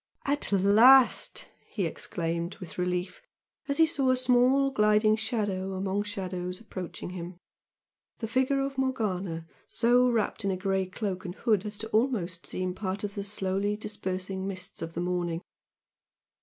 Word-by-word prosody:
"At 285 -4 +1
last!" 220 +7 +5 0.2
he - - -1
exclaimed, 170 -1 -3
with 180 -1 -9
relief, 180 - -2 0.5
as 280 - 0
he 325 - +7
saw 280 -5 +1
a 255 - +4
small 255 +2 +4
gliding 215 -2 +4
shadow 205 -4 -2
among 195 +1 -1
shadows 185 -3 -4
approaching 185 -5 -7
him, 175 -1 -7 0.8
he 225 - -2
figure 260 +4 +1
of 275 0 -3
Morgana 195 -10 -1 0.2
so 245 +2 +3
wrapped 225 -2 0
in 200 - 0
a 190 - 0
grey 190 0 0
cloak 185 -1 -4
and 180 -2 -6
hood 215 -3 +1
as 210 0 -6
to 220 +2 -5
almost 215 -8 0
seem 185 0 -3
part 195 +1 -4
of 205 -1 -3
the 200 - -4
slowly 200 0 -1
dispersing 190 -2 -4
mists 185 -1 -5
of 165 0 -5
the 170 - -1
morning. 175 -1 -2
200 Hz, 155 wpm, -28 LUFS, 185-230 Hz, 0.8 s, he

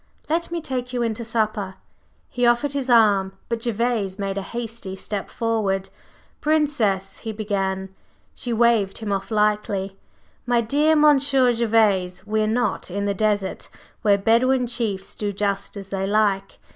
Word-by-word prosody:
Let 335 +2 0
me 340 0 -3
take 255 -4 -4
you 245 -1 0
in 230 -1 0
to 235 - -6
supper." 215 -4 -1 0.5
He 245 - -4
offered 240 +4 +3
his 275 -2 -2
arm, 205 -5 +4 0.2
but 235 -1 -2
Gervase 230 -4 -1
made 195 -1 -3
a 200 - -2
hasty 225 -2 -5
step 200 +1 -5
forward. 200 -4 -1 0.5
"Princess," 250 -12 +1
he 225 - -5
began 195 -3 -2 0.4
She 245 - -6
waved 230 -4 +2
him 215 -2 -4
off 195 -1 -2
lightly. 210 -3 0 0.5
"My 240 -1 +3
dear 290 +7 +2
Monsieur 280 -4 +4
Gervase, 210 -5 +1
we 215 +1 0
are 215 - +1
not 240 -1 -1
in 200 +3 -2
the 200 - +1
desert, 205 -1 -1 0.3
where 205 -2 +4
Bedouin 245 +5 +3
chiefs 220 -5 -3
do 205 -1 -2
just 200 0 -2
as 195 -1 -8
they 195 0 -2
like. 200 -2 +1
215 Hz, 160 wpm, -23 LUFS, 195-240 Hz, 0.5 s, arm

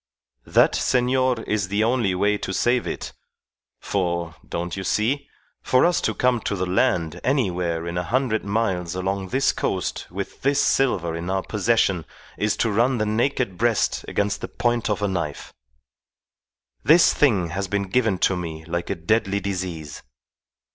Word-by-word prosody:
That, - - +4
senor, 125 -1 +1
is 105 -3 -1
the 100 +3 +1
only 115 -5 +1
way 100 +3 +2
to 95 - -4
save 120 +4 +1
it; - - -5 0.7
for, 85 -4 -2 0.2
don't 85 +1 -3
you 95 - -4
see? 130 +9 0 0.3
for 130 +3 +3
us 175 0 +2
to 110 - -1
come 125 -1 +2
to 100 - -2
the 95 -1 -1
land 90 -3 0
anywhere 90 - 0
in 85 +1 -2
a - - -2
hundred 120 +1 0
miles 95 -5 -1
along 95 +1 -2
this 135 +7 +2
coast - - -2
with 100 +2 -6
this 140 +1 +2
silver 90 -11 +1
in 85 +2 -5
our 95 0 0
possession 105 -5 +1 0.3
is 105 +1 0
to 115 - +1
run 120 +5 +2
the 110 - 0
naked 110 -2 0
breast 115 -1 +1
against 100 0 -1
the - - -4
point 120 -2 -1
of 105 0 -1
a - - +2
knife. 85 -6 -4 1.3
This 165 +3 +6
thing 100 - +2
has 95 +4 -3
been 100 +1 -1
given 110 -1 +1
to 95 - +1
me 80 -3 -6
like 85 +1 -3
a - - 0
deadly 100 +3 0
disease. 90 -6 -5
100 Hz, 165 wpm, -23 LUFS, 90-120 Hz, 1.3 s, This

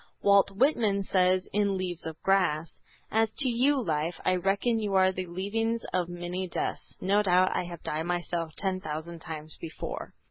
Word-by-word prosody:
Walt 200 -1 +5
Whitman 210 -3 +2
says 185 0 +2
in 200 -1 +2
"Leaves 180 -3 -3
of 160 -1 -7
Grass:" 175 -5 +1 0.3
"As 220 0 +2
to 275 - +3
you, 265 +4 +3
Life, 165 -5 -1
I 185 - +3
reckon 200 +5 +1
you 205 -3 -1
are 190 0 +5
the 185 -1 -5
leavings 225 +6 -1
of 180 -1 0
many 175 +1 -4
deaths, - - -3
No 200 +3 +3
doubt 185 -2 +3
I - - 0
have 175 -2 -9
died 155 +2 -2
myself 175 -2 -2
ten 190 -2 0
thousand 160 +1 -6
times 155 -2 -8
before." 160 -1 -6
185 Hz, 175 wpm, -28 LUFS, 170-200 Hz, 0.3 s, Walt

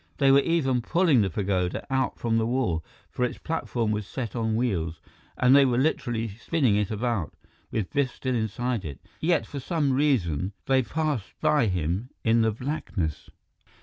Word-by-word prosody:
They 135 - +5
were 135 - +7
even 140 -5 +1
pulling 165 -1 +3
the 100 - +1
pagoda 95 0 -1
out 130 - 0
from 115 -1 +1
the 110 - 0
wall, 115 -10 0 0.3
for 125 - -2
its 125 - -1
platform 120 -9 -2
was 105 -1 -2
set 120 -2 -5
on 110 -2 0
wheels; 90 -9 -1 0.4
and 130 +1 +5
they 140 - +8
were 125 -3 +2
literally 120 -5 0
spinning 115 +3 0
it 105 -2 +1
about, 110 -5 -2 0.3
with 105 -4 -3
Biff 140 -3 +1
still 130 -1 -2
inside 120 0 -1
it, 70 -4 -7 0.2
yet 170 +2 +2
for 140 - -6
some 145 -1 0
reason, 100 - +1
they 135 -1 +3
passed 145 -3 -2
by 150 -6 +3
him 90 +5 -1
in 115 0 +4
the 110 0 +3
blackness. 110 - -3
120 Hz, 175 wpm, -26 LUFS, 105-135 Hz, 0.4 s, they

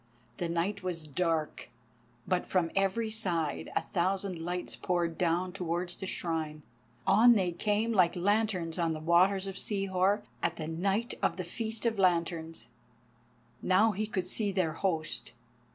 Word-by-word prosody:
The 175 - -2
night 180 +4 -1
was 175 -4 -3
dark, 160 -2 -1 0.6
but 180 -1 0
from 175 -3 +1
every 195 +3 +1
side 175 -8 -1
a - - +3
thousand 190 -1 -1
lights 175 +2 -3
poured 175 -2 -1
down 175 +2 0
towards 175 -1 -2
the 190 - -6
Shrine. 160 -4 -3 0.4
On 220 +5 +7
they 190 -5 +1
came 210 +6 0
like 180 -5 +4
lanterns 185 -3 0
on 165 -1 +1
the 155 - -5
waters 185 +4 +3
of 195 -1 -5
Sihor 195 0 +1 0.2
at 170 - 0
the 155 -2 -5
night 195 +8 -1
of - - +1
the 185 - -2
feast 220 +6 -3
of 225 -3 +1
lanterns. 170 -6 +1 1.0
Now 200 +4 +4
he 210 +2 -2
could 190 -4 -2
see 200 +2 0
their 180 -5 0
host. 165 -3 -2
180 Hz, 150 wpm, -31 LUFS, 170-200 Hz, 1.0 s, On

